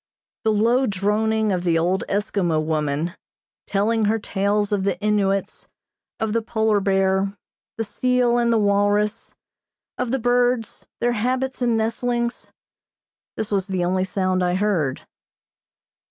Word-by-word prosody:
The 220 - +4
low 235 +5 +2
droning 215 +2 +1
of 180 -2 -1
the 170 -2 +2
old 180 +3 +1
Eskimo 195 -5 0
woman, 155 +1 -1 0.5
telling 215 +2 +1
her 220 +2 +2
tales 205 0 0
of 200 -2 0
the 195 -2 +1
Innuits, 195 0 -1 0.5
of 220 -1 -1
the 230 - +1
Polar 220 -2 +1
bear, 195 0 +1 0.4
the 225 - -1
seal 245 +2 +1
and 235 0 +2
the 230 - +3
walrus, 205 0 +1 0.6
of 250 -1 -1
the 265 - +1
birds, 245 -1 0
their 240 - +2
habits 255 +4 -1
and 235 -2 +2
nestlings; 235 +2 -2 0.9
this 215 -1 -3
was 195 -2 0
the 185 -2 -1
only 185 +1 +1
sound 185 -1 0
I 180 0 +1
heard. 185 -9 0
210 Hz, 140 wpm, -22 LUFS, 190-230 Hz, 0.9 s, The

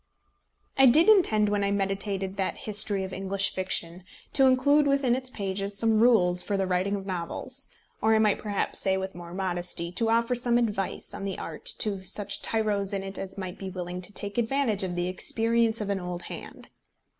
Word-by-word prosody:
I 270 - +8
did 310 - +6
intend 225 - +5
when 205 -1 0
I 200 - +1
meditated 195 -1 -1
that 190 - -1
history 205 -2 +2
of 190 0 -6
English 195 +1 0
fiction 185 -1 -2 0.3
to 270 -2 +5
include 285 +3 +4
within 275 -3 +2
its 255 0 -4
pages 200 -2 -3
some 225 0 +3
rules 185 -7 +4
for 200 - -2
the 195 - 0
writing 185 +2 0
of 195 -1 -6
novels; 195 +9 -5 0.3
or 220 +1 +4
I - - +4
might 215 -2 +3
perhaps 205 -2 +1
say, 190 0 +2
with 190 0 -4
more 175 -1 -10
modesty, 175 -2 -3
to 225 +5 -1
offer 230 +2 +2
some 240 -1 +1
advice 210 -5 -2
on - - -6
the 195 -2 -3
art 160 - -8
to 200 -3 -1
such 200 +1 -3
tyros 210 -3 0
in 195 - -3
it 195 0 -5
as 190 0 -6
might 185 -2 -6
be 195 - -5
willing 180 -1 -5
to 185 - -5
take 205 +2 -3
advantage 235 -3 0
of 180 -2 -3
the 175 0 -1
experience 225 +4 0
of 200 -1 -2
an 195 - -1
old 180 -1 -5
hand. - - -9
200 Hz, 200 wpm, -27 LUFS, 190-225 Hz, 0.3 s, I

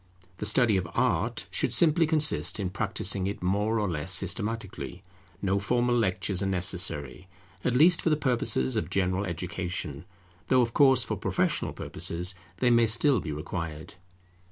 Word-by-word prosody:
The 105 - -3
study 110 -1 +3
of 95 - -3
Art - - 0
should - - 0
simply 165 0 +4
consist 150 - +2
in 95 -3 -3
practising 95 -2 0
it 100 -2 -5
more 105 +4 0
or 105 - -1
less 85 0 -2
systematically. 100 -1 -2 0.4
No 100 +1 +1
formal 120 +4 0
lectures 95 -3 0
are 100 - -1
necessary, 90 -4 -2 0.4
at 125 - 0
least 165 +6 +5
for - - +1
the 155 - +2
purposes 120 - 0
of - - -2
general 95 0 0
education, 85 -4 -5 0.4
though 130 -1 +4
of 115 -1 -3
course 135 -4 +5
for - - -4
professional - - -1
purposes 90 +3 -2 0.2
they 125 -1 +2
may 115 -1 +4
still 120 +3 +4
be 80 - -5
required. 80 0 -6
100 Hz, 155 wpm, -27 LUFS, 90-120 Hz, 0.4 s, least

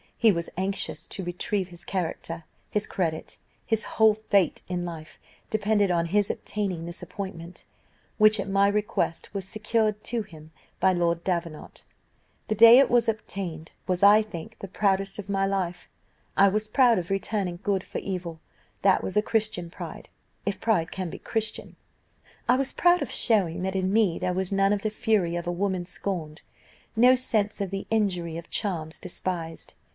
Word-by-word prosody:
He 225 -2 +5
was 170 -3 -3
anxious 195 +1 -2
to 195 - -5
retrieve 180 +2 -2
his 175 -1 -9
character; 170 -2 -4 0.3
his 210 0 0
credit, 160 -4 -3 0.3
his 225 0 +1
whole 220 -1 +4
fate 200 -5 +1
in 180 -1 -2
life, 160 -2 -8 0.3
depended 210 -2 +2
on 170 -1 +1
his 205 +3 +2
obtaining 190 -6 -3
this 170 +1 -7
appointment, 180 -3 -7 0.5
which, 215 0 +6
at 195 - -3
my 195 +1 +4
request, 205 -5 -1
was 195 -2 -4
secured 215 0 0
to 235 -1 -1
him 160 -6 -12 0.3
by 190 0 +4
Lord 170 -1 0
Davenant. 170 -4 -4 0.6
The 215 - 0
day 230 +3 +9
it 275 - +5
was 240 -1 +3
obtained 185 -7 -4 0.2
was, 185 0 0
I 205 +2 +8
think, 215 +1 -8
the 195 - -6
proudest 195 0 0
of 205 -1 -7
my 195 -1 +1
life. 185 -3 -2 0.5
I 200 - +7
was 215 +2 0
proud 240 +1 +4
of 175 - -6
returning 195 -2 -2
good 195 -2 0
for - - -5
evil; 175 -4 -5 0.4
that 195 -1 +4
was 190 - -2
a 210 - +4
Christian 215 -6 -1
pride, - - -8 0.4
if 200 - -1
pride 190 -8 +1
can 185 -2 -3
be - - -8
Christian. 220 -1 -4 0.7
I 250 - +6
was 270 0 -1
proud 350 0 +4
of - - -3
showing 185 -7 +2
that 190 0 -2
in 190 0 0
me 210 -6 +3
there 180 0 -1
was 185 +1 -2
none 195 +1 +3
of 205 - -2
the 215 - 0
fury 205 -6 +1
of 175 0 -3
a - - +1
woman 185 0 -1
scorned 170 -5 -4 0.5
no 250 +3 +6
sense 215 -5 0
of 195 - -1
the 195 0 -4
injury 180 -7 0
of 170 - -10
charms 165 -7 -2
despised. 175 -2 -5
195 Hz, 175 wpm, -26 LUFS, 175-215 Hz, 0.7 s, day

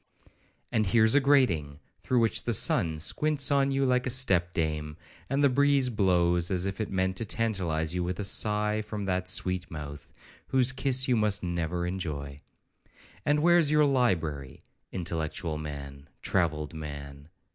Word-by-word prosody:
And 110 -2 +1
here's 110 +2 +4
a 145 - +6
grating, 95 - +2 0.2
through 125 -2 +1
which 115 - 0
the 120 - +1
sun 80 -4 +1
squints 145 - 0
on 140 -1 +3
you 135 0 +1
like 125 0 +1
a - - 0
step 95 -9 +2
dame, 75 -2 -3 0.3
and 140 +1 +1
the - - +7
breeze 140 0 +2
blows, 90 -5 +1
as 90 -1 -1
if 100 +2 -3
it 110 - -3
meant 95 0 -1
to - - -1
tantalize 90 -8 -1
you 90 0 -1
with 90 0 -3
a - - -2
sigh 105 +1 +2
from 105 -1 -6
that 90 -1 -1
sweet 90 -1 0
mouth, 75 -2 -8 0.4
whose 130 -1 +2
kiss 130 0 0
you 125 - +3
must 105 -3 +1
never 85 0 -2
enjoy. 75 -6 -5 0.9
And 150 +1 +3
where's 175 -3 +4
your 150 0 +4
library,—intellectual 80 - -3
man,—travelled 75 +2 -4
man?' 70 -2 -8
95 Hz, 155 wpm, -28 LUFS, 80-125 Hz, 0.9 s, the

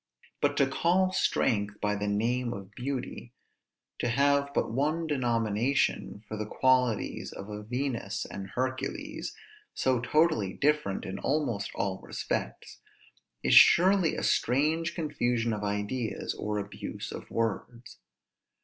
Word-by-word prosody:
But 145 0 +2
to 140 - +5
call 175 +7 +2
strength 105 - +1
by 105 0 0
the 105 0 -2
name 120 +4 0
of 100 0 -9
beauty, 125 -1 -5 0.7
to 120 - 0
have 140 +3 +2
but - - 0
one 150 +7 0
denomination 120 -4 0
for 110 - -5
the 105 0 -3
qualities 125 -3 +1
of 100 - -8
a 105 0 -5
Venus 125 -2 -3
and 95 -1 -7
Hercules, 130 +3 -3 0.4
so 130 -2 +2
totally 125 - +2
different 150 -9 0
in 95 +1 -5
almost 130 -9 -1
all 95 -1 -1
respects, - - -4 0.6
is - - +3
surely 185 -1 +7
a - - -3
strange 155 +7 +1
confusion 120 -8 0
of 105 -1 -4
ideas, 105 +3 -2
or 105 0 -3
abuse 100 0 -6
of - - -8
words. 115 +2 -3
120 Hz, 130 wpm, -29 LUFS, 105-140 Hz, 0.7 s, surely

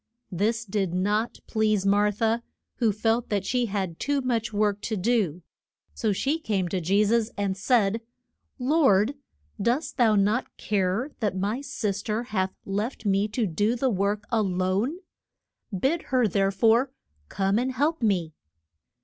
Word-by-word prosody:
This 220 +6 0
did 195 -3 -1
not 210 +5 0
please 215 -3 +1
Mar 205 +1 +3
tha, 225 +3 0 0.4
who 230 -3 +3
felt 225 +3 0
that 205 -2 -1
she 250 -2 +1
had 190 -5 -3
too 285 0 0
much 235 -3 -1
work 205 -1 +1
to 215 0 -2
do; 185 -5 0 0.5
so 220 -3 0
she 275 +11 0
came 200 - -1
to 185 0 -1
Je 195 +5 +3
sus 225 +1 +2
and 200 -2 0
said, 220 +1 +2 0.6
Lord, 255 -5 +3 0.5
dost 240 +9 0
thou 225 -4 +4
not 210 +5 +1
care 205 +7 0
that 205 -5 -1
my 210 +7 -1
sis 210 -8 -3
ter 215 +3 -2
hath 190 -5 -2
left 210 +5 -3
me 200 +1 +2
to 220 +2 -1
do 205 +6 +1
the 255 +1 +1
work 200 +1 0
a 225 - +3
lone? 190 - 0 0.7
Bid 265 - 0
her 255 -3 +3
there 195 0 +1
fore 230 +6 +3 0.4
come 195 +2 +1
and 255 +2 0
help 295 +5 0
me. 180 -8 +1
210 Hz, 160 wpm, -26 LUFS, 195-235 Hz, 0.7 s, thou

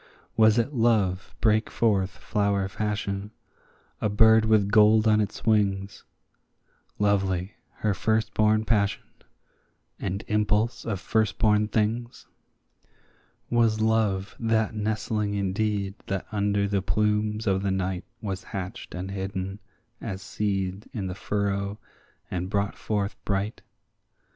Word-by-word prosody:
Was 110 0 +5
it 120 +5 +1
Love 105 -6 +1
brake 110 -1 +3
forth 100 -5 +1
flower 100 +1 -1
fashion, 100 0 -3 0.7
a 105 - +1
bird 110 +1 +5
with 105 -2 +3
gold 110 0 +6
on 110 0 +5
his 105 - -3
wings, 100 -3 +1 0.9
Lovely, 95 -2 +1 0.3
her 105 - +3
firstborn 110 +1 +1
passion, 100 -3 +1 1.0
and 100 +2 -3
impulse 105 +2 +1
of 105 -5 -2
firstborn 105 +1 +2
things? 115 +3 -1 1.3
Was 115 -2 +3
Love 110 -3 +1
that 110 -2 +1
nestling 105 -1 -1
indeed 100 0 -1
that 95 -1 -2
under 100 -1 +1
the 100 -1 0
plumes 105 +3 0
of 95 -2 +2
the 100 - 0
night 95 -1 -1 0.2
Was 95 -2 -3
hatched 95 -2 -6
and 95 +2 -5
hidden 95 0 -4 0.4
as 95 -4 -5
seed 100 -1 -2
in 105 -6 -3
the 90 - -3
furrow, 100 +1 -2 0.5
and 90 0 -2
brought 100 0 0
forth 105 -1 -2
bright? 100 +2 -2
105 Hz, 120 wpm, -26 LUFS, 95-110 Hz, 1.3 s, gold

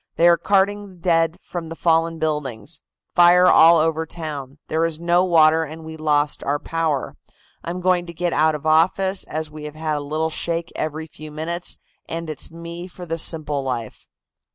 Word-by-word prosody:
They 170 - +4
are 170 - +7
carting 200 +1 0
dead 165 -1 +1
from 170 -3 -6
the 165 - -6
fallen 165 0 +1
buildings. 150 -4 -3 0.3
Fire 175 +1 +6
all 170 -1 +7
over 160 0 0
town. 150 -5 -6
There 160 +1 0
is 165 -1 -1
no 175 +1 +3
water 160 -2 +4
and 160 +1 -9
we 160 0 -8
lost 150 -1 0
our 145 +1 0
power. 160 -3 -2 0.5
I'm 175 +2 -4
going 180 -1 +1
to - - -6
get 175 +1 -2
out 155 0 +3
of 150 0 -8
office, 185 +5 +2
as 155 0 -5
we 150 0 -9
have 150 0 -8
had 155 -1 -2
a - - -3
little 155 +3 -2
shake 170 +1 -2
every 155 +1 -3
few 155 0 -11
minutes, 165 +3 -4 0.3
and 165 -1 -4
it's 150 - -4
me 170 +1 -8
for 180 0 -10
the 165 0 -3
simple 150 -3 +1
life." 120 -5 -5
160 Hz, 185 wpm, -21 LUFS, 155-170 Hz, 0.5 s, are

